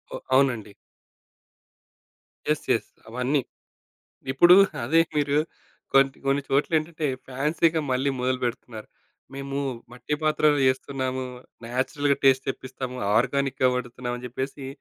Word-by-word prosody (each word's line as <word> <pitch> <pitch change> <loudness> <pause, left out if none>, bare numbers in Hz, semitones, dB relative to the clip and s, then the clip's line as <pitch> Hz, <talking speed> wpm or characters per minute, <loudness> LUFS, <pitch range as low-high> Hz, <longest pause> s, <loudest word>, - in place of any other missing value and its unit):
ఓహ్! - - -7
అవునండి. 125 -6 +2 1.8
Yes. - - 0
Yes - - 0 0.2
అవన్నీ. 125 +4 0 0.9
ఇప్పుడూ 175 +7 +7 0.3
అదే 160 +7 +4 0.2
మీరు 145 -1 +1 0.6
కొన్ని, 135 0 +5
కొన్ని 140 +1 +2
చోట్లేంటంటే 155 +3 0 0.2
ఫాన్సీ‌గా 155 +5 +1
మళ్ళీ 130 +2 +1
మొదలుబెడుతున్నారు. 125 -3 -3 0.5
మేము 140 0 -5 0.4
మట్టి 125 +4 -3
పాత్రలో 155 -1 +3
జేస్తున్నాము, 130 0 -1 0.4
నేచరల్‌గా 140 +4 0
టేస్ట్ 135 -1 +4
తెప్పిస్తాము, 130 -1 -5 0.2
ఆర్గానిక్‌గా 135 +2 +2
వండుతున్నాము, 125 0 -4
అని 125 - -11
జేప్పేసి. 130 +2 -5
135 Hz, 100 wpm, -25 LUFS, 125-145 Hz, 1.8 s, ఇప్పుడూ